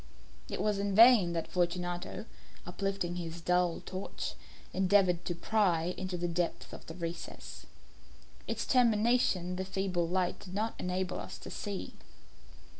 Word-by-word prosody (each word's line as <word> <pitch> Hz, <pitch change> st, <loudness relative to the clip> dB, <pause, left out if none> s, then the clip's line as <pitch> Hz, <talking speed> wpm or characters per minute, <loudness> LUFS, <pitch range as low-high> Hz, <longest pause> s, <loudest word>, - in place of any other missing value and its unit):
It -, -, -4 dB
was 210 Hz, -2 st, +1 dB
in 200 Hz, -1 st, 0 dB
vain 225 Hz, -6 st, +8 dB
that 165 Hz, -1 st, -2 dB
Fortunato, 175 Hz, +2 st, -2 dB, 0.4 s
uplifting 180 Hz, -1 st, -2 dB
his 170 Hz, -1 st, -5 dB
dull 180 Hz, 0 st, +1 dB
torch, 190 Hz, +1 st, -5 dB, 0.4 s
endeavoured 185 Hz, -2 st, +3 dB
to 175 Hz, -, -2 dB
pry 180 Hz, -3 st, +1 dB
into 185 Hz, -1 st, -3 dB
the 175 Hz, 0 st, -1 dB
depth 170 Hz, 0 st, -2 dB
of -, -, -10 dB
the 160 Hz, -, -7 dB
recess. 170 Hz, -1 st, -7 dB, 0.8 s
Its -, -, -2 dB
termination 225 Hz, -6 st, +3 dB
the 190 Hz, -, -1 dB
feeble 190 Hz, -2 st, -1 dB
light 180 Hz, +1 st, 0 dB
did 185 Hz, -1 st, -9 dB
not 220 Hz, +2 st, 0 dB
enable 180 Hz, 0 st, -2 dB
us -, -, -7 dB
to -, -, -9 dB
see. 200 Hz, -2 st, -5 dB
180 Hz, 140 wpm, -32 LUFS, 175-200 Hz, 0.8 s, vain